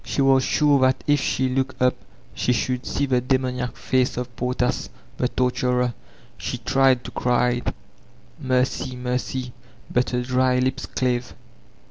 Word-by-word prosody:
She - - -4
was 135 -1 +5
sure 145 0 +3
that 130 0 +2
if 145 0 +3
she 130 0 0
looked 130 0 -1
up 125 0 +4 0.4
she 125 - +1
should 125 +1 -1
see 140 - 0
the 130 -2 +1
demoniac 125 -2 -1
face 130 -2 0
of 125 -1 -5
Portas, 125 0 -1 0.3
the 125 - +1
torturer. 125 -1 0 0.5
She - - -3
tried 135 -2 +3
to - - -8
cry, 125 0 +1 0.8
"Mercy, 130 0 0
mercy/* 125 0 -3 0.4
but 125 0 +1
her 125 0 -1
dry 130 0 +2
lips 130 +1 -1
cbve. 125 -1 -1
125 Hz, 145 wpm, -23 LUFS, 125-130 Hz, 0.8 s, was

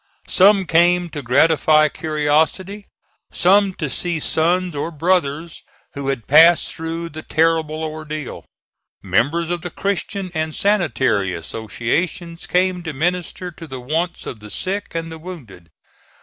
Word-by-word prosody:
Some 195 0 +5
came 175 +1 +3
to 150 -2 -6
gratify 155 +4 +4
curiosity; 160 +7 -1 0.4
some 195 +2 +4
to 150 - -3
see 170 +5 -2
sons 175 +3 0
or 145 - -2
brothers 165 -1 -1 0.3
who 140 -1 -5
had 135 -5 -2
passed 165 +4 +6
through 165 +1 -5
the 155 0 -8
terrible 160 -1 0
ordeal; 155 -2 -6 0.6
members 140 - +1
of 175 -1 -2
the 175 - -5
Christian 195 +1 -3
and 155 -1 -2
Sanitary 130 - +1
Associations 135 - -3
came 180 0 +1
to 160 -3 -5
minister 175 +4 -2
to 165 0 -11
the 130 -3 -7
wants 160 +8 -2
of 115 - -7
the 105 0 -11
sick 190 - -4
and 165 0 -3
the 160 - -8
wounded. 130 - -11
160 Hz, 135 wpm, -20 LUFS, 145-175 Hz, 0.6 s, passed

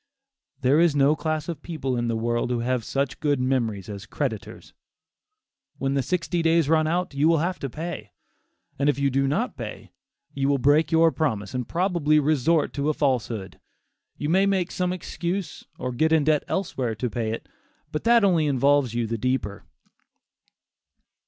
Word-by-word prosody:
There 135 +4 +4
is 170 -3 +4
no 140 +2 +4
class 155 -1 -2
of 165 -4 -5
people 135 -6 -3
in 120 0 -1
the 115 - 0
world 120 +1 -1
who 120 -1 -1
have 125 0 -1
such 135 +3 -2
good 145 -3 +1
memories 120 -7 -1
as 100 0 -8
creditors. 120 -9 -5 1.0
When 135 0 -1
the 140 - +1
sixty 170 +4 -1
days 165 -2 +3
run 155 0 +3
out, 175 0 -1
you 140 +3 +2
will 165 0 +4
have 175 +4 -1
to 135 - -4
pay. 155 -7 -6 0.7
If 140 0 +2
you 140 -1 +1
do 135 +1 +1
not 140 - -1
pay, - - -8 0.4
you 140 0 0
will 140 - +3
break 145 +5 +3
your 165 0 +5
promise 110 - -2
and 125 -2 -3
probably 170 -4 +2
resort 155 +2 +2
to 145 +1 -1
a 155 - 0
falsehood. 120 -8 -1 0.6
You 145 - -3
may 190 +5 +3
make 190 -3 0
some 180 -1 -1
excuse 180 +1 -4
or 125 - -3
get 155 +6 +1
in 160 -2 +4
debt 155 0 +2
elsewhere 130 - -2
to 125 - -2
pay 115 -1 -2
it, 115 - -6 0.4
but 150 - -3
that 235 -1 +5
only 170 -6 +3
involves 140 -2 +2
you 120 -1 0
the 115 0 -3
deeper. 125 -5 -2
145 Hz, 180 wpm, -25 LUFS, 125-160 Hz, 1.0 s, your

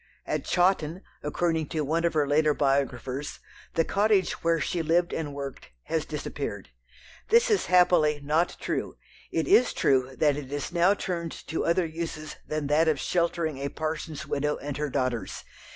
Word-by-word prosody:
At - - -2
Chawton, 180 -1 +1 0.2
according 160 +1 0
to 155 - -2
one 165 +4 0
of 170 - 0
her 150 -2 +2
later 150 +1 +3
biographers, 135 -1 -1 0.4
the 165 - +3
"cottage" 205 -2 +2
where 165 0 +2
she 165 +3 -1
lived 170 +2 +2
and 155 -3 -3
worked 140 -1 -7
has - - -1
disappeared. - - -5 0.6
This 470 +2 +5
is 415 - +2
happily 175 -5 +4
not 155 +4 0
true. - - -3 0.4
It - - 0
is 350 -10 +5
true 130 -1 +2
that 145 -1 +2
it 140 -2 -7
is 145 +2 -3
now 180 +3 +4
turned 170 -4 -3 0.2
to 160 - -1
other 170 +1 +2
uses 160 -1 -5
than 155 -1 -2
that 150 +3 +3
of 155 -3 +2
sheltering 170 -4 0
a 140 +1 -2
parson's 155 0 -4
widow 150 +1 -1
and 145 0 -5
her 150 0 -2
daughters. 130 -4 -2
155 Hz, 170 wpm, -27 LUFS, 145-170 Hz, 0.6 s, This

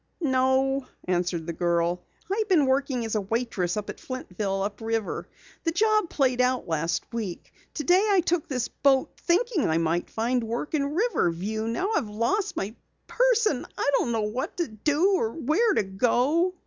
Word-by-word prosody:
"No," 265 -2 +2 0.2
answered 175 -2 0
the 170 - -4
girl. 170 +1 0 0.3
"I've 430 0 -1
been 325 -7 +5
working 265 -2 0
as 225 - -3
a 215 - +1
waitress 205 -4 -1
at 210 - -2
Flintville, 195 -6 -3
up 205 +1 -6
river. 225 -2 -2 0.4
The 330 - +1
job 425 +1 +2
played 255 -3 +2
out 250 -2 +1
last 165 0 -1
week. 210 -7 -5 0.2
Today 355 +7 +3
I 390 -3 +4
took 345 -2 0
this 250 -4 -1
boat, 270 -2 +2
thinking 370 - +1
I 160 - +2
might 165 +1 0
find 240 +2 0
work 235 +7 -4
in 285 -1 0
Riverview. 220 - 0
Now 365 - -1
I've 215 - 0
lost 235 - -1
my 205 +4 -3 0.3
purse 485 -2 +2
and 285 -12 +1
I 285 - +1
don't 240 - -1
know 225 -1 0
what 215 +5 -3
to 345 - 0
do 295 - +1
or 225 -6 -1
where 370 - +2
to - - +3
go." 250 - +1
250 Hz, 175 wpm, -26 LUFS, 210-325 Hz, 0.4 s, been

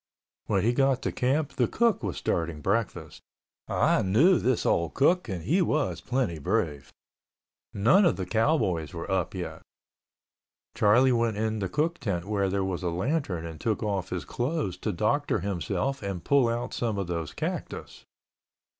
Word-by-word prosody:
When 100 -3 +1
he 120 +3 +3
got 135 0 +2
to - - -1
camp, 140 +4 0
the 125 -3 +3
cook 235 -7 +1
was 100 -7 -3
starting 80 -2 -1
breakfast. 100 +7 -2 0.5
(I - - +2
knew 140 - +4
this 130 -2 0
old 85 -1 +1
cook 170 +1 +3
and 90 -4 -4
he 170 - +2
was 155 -4 0
plenty 120 -11 -1
brave.) 80 -5 -1 0.8
None 120 - +4
of 170 - +3
the 95 - -4
cowboys 95 - 0
were - - -5
up - - -1
yet. - - -5 1.1
Charlie 125 +6 +4
went 115 -3 +1
in 110 0 -1
the 95 -2 -2
cook 165 - 0
tent 95 -7 -2
where 100 -2 0
there 95 0 0
was 95 -1 -3
a 90 - -1
lantern 95 - -1
and 80 -2 -8
took 110 -1 -1
off 100 -3 -2
his 90 -6 -4
clothes 120 - -2
to 105 - -2
doctor 110 - 0
himself 100 - -2
and 100 -4 -4
pull 140 -4 +3
out 120 +1 -3
some 115 -4 -1
of 100 - -1
those 85 -3 -3
cactus. - - -5
110 Hz, 170 wpm, -27 LUFS, 90-135 Hz, 1.1 s, knew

